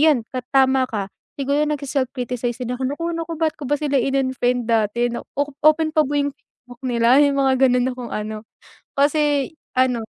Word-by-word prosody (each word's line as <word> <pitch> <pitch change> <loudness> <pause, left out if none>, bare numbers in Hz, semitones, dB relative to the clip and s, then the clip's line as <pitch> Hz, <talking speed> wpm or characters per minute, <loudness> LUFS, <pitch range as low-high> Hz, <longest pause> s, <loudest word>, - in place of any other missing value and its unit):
'yan 300 -6 +4 0.3
tama 265 -1 +4
ka, 205 -5 -3 0.3
siguro 280 +2 +1
nag-se-self-criticize 255 -4 -2
din 250 +1 -3
ako 260 - -3
nako 335 - -9
nako 330 0 -4
ba't 320 -1 +1
ko 290 - -7
ba 290 - +2
sila 290 -2 0
in-unfriend 255 -2 0
dati 230 +2 +1
na - - -4 0.4
open 310 +1 +4
pa 310 -2 +4
yung 285 0 0
Facebook 245 -2 -19
nila 240 +1 +3
yung 280 -1 0
mga 265 -1 +3
ganun 250 0 +2
na 260 - -1
kung 240 - -6
ano 215 0 -4 0.6
kasi 290 0 +2 0.3
ano, 250 -3 +2
260 Hz, 170 wpm, -21 LUFS, 245-290 Hz, 0.6 s, yan